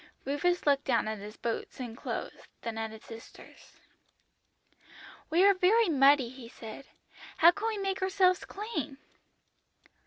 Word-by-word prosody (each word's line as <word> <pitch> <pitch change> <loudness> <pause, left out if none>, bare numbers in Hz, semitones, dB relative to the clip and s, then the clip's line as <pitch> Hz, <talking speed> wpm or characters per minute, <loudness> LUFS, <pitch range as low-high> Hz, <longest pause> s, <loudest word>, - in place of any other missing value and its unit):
"Rufus 340 +7 0
looked 280 -1 +3
down 235 -5 +1
at 215 -1 -3
his 210 +2 -10
boots 235 +3 -4
and 240 -3 -6
clothes, - - -6 0.2
then 230 -1 -4
at 225 0 -3
his 220 0 -12
sister's. 225 0 -14 1.5
"'We 335 +4 +4
are 400 - +7
very 390 +3 +3
muddy,' 275 -3 +5
he 250 -2 -11
said; 230 +4 -10 0.5
'how 335 +2 +8
can 410 +5 -4
we 440 -2 -1
make 390 -1 -2
ourselves 375 -1 +2
clean?' 395 - -5
285 Hz, 145 wpm, -30 LUFS, 230-375 Hz, 1.5 s, how